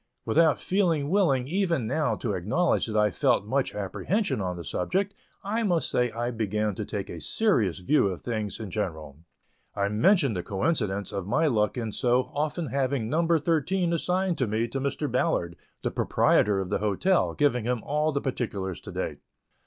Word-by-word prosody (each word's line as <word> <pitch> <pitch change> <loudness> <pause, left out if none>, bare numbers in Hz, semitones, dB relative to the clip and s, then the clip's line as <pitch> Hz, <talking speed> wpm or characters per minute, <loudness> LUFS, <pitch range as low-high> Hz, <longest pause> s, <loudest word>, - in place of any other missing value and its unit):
Without 155 +6 +3
feeling 170 -7 +1
willing 140 -11 +2
even 170 - 0
now 140 +6 0
to 110 -5 -3
acknowledge 110 - +1
that 110 -1 -2
I 105 -1 +3
felt 100 - +2
much 135 +5 -1
apprehension 105 - -1
on 90 -2 -3
the 85 - -6
subject, 190 - -1 0.3
I 215 +4 -1
must 180 -7 +1
say 125 0 +2
I 120 +2 -3
began 105 -2 -1
to 105 +2 -4
take 100 -1 -4
a - - -7
serious 120 - +1
view 100 +6 +2
of 95 -3 -4
things 110 -4 -3
in 105 -4 -6
general. 80 -9 -4 0.6
I 100 -1 0
mentioned 130 - +3
the 90 - -1
coincidence 100 - -1
of 100 -2 -4
my 150 +10 +2
luck 110 -5 +1
in 115 -3 -2
so 125 +3 +1
often 155 +3 -1
having 130 -3 -1
"number 165 +1 +3
thirteen" 170 +3 0
assigned 180 +2 0
to 125 - +1
me 110 +3 0
to 135 - -3
Mr. 140 +2 -1
Ballard, 85 -9 0 0.3
the - - -1
proprietor 100 -2 +2
of 95 -2 -4
the - - +1
hotel, 105 - +1
giving 130 -6 +2
him 125 -1 -1
all 150 +2 0
the 140 -1 -1
particulars 100 - -3
to - - -9
date. - - -4
125 Hz, 185 wpm, -27 LUFS, 105-160 Hz, 0.6 s, Without